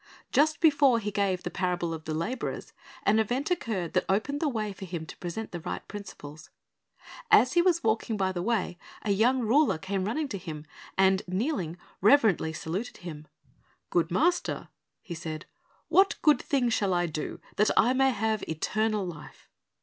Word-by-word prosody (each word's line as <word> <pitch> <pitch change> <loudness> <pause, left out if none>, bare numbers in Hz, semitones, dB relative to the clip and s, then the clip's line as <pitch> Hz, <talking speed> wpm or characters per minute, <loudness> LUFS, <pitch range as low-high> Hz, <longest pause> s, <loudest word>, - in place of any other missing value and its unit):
Just 305 +1 +3
before 285 -6 +5
He 210 -2 -3
gave 195 -3 0
the - - -4
parable 175 -2 -1
of 160 0 -7
the 155 - -3
laborers, 225 +11 -4 0.3
an 215 +2 +4
event 245 - -1
occurred 215 - -2
that - - +2
opened 220 +9 0
the 310 - +1
way 215 -5 -2
for 195 0 -8
Him 170 -3 -5
to - - -10
present 180 +6 -5
the 175 - -5
right - - -6
principles. 160 -7 -9 0.8
As 340 - +6
He 345 - +5
was 345 -2 +2
walking 220 0 0
by 190 -1 +1
the 175 -2 -3
way, 190 -4 -1 0.2
a 210 - 0
young 240 +6 +3
ruler 245 - +3
came 190 +3 -2
running 295 +9 -1
to 200 - -4
Him, 155 -3 -7 0.3
and 190 0 +4
kneeling, 185 - -2 0.2
reverently 210 - +4
saluted 170 +8 -4
Him. 155 -3 -7 0.6
"Good 170 -1 +2
Master," 330 - 0 0.3
he 175 - -6
said, 160 -1 -6 0.4
"what 385 +1 +4
good 300 -5 +5
thing 260 -4 +1
shall 200 -5 +1
I 175 0 +2
do, 155 -2 -4 0.2
that 210 - +4
I 245 +3 +5
may 270 +1 +4
have 220 -3 0
eternal 215 +6 0
life?" 155 -4 -10
205 Hz, 175 wpm, -28 LUFS, 175-250 Hz, 0.8 s, As